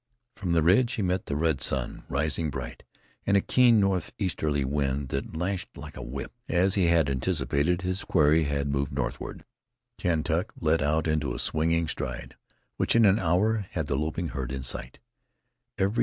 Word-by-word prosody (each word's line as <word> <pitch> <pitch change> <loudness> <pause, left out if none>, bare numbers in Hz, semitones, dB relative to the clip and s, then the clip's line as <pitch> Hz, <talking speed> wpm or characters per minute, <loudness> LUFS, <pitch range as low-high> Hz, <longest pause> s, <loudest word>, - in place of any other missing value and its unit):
From 95 -5 -2
the 80 -2 +3
ridge 115 +9 +4
he 105 - -1
met 90 +1 -1
the 70 - -2
red 80 -2 +1
sun, 65 -3 -1
rising 75 +2 0
bright, 65 -2 -6 0.4
and 100 0 +3
a - - +5
keen 120 +2 +4
northeasterly 90 -6 0
wind 70 0 -1
that 70 +4 -4
lashed 90 +2 -3
like - - -9
a - - -7
whip. 65 +3 -6 0.2
As 95 +2 +3
he 95 -3 +3
had 85 -3 +4
anticipated, 70 +4 0
his 95 +1 -2
quarry 80 -1 +3
had 70 0 -1
moved 70 0 -1
northward. - - -4 0.5
Kentuck 85 +1 0
let 80 0 +2
out 75 +2 +1
into 75 -5 0
a - - -4
swinging 80 +1 +1
stride, 65 -4 -5 0.4
which - - +1
in 115 -1 +6
an 100 +2 +5
hour 100 +4 +1
had 80 -3 -1
the 70 - -1
loping 80 +4 -2
herd 65 -3 -4
in 65 -1 -4
sight. - - -4
80 Hz, 170 wpm, -27 LUFS, 70-90 Hz, 0.5 s, in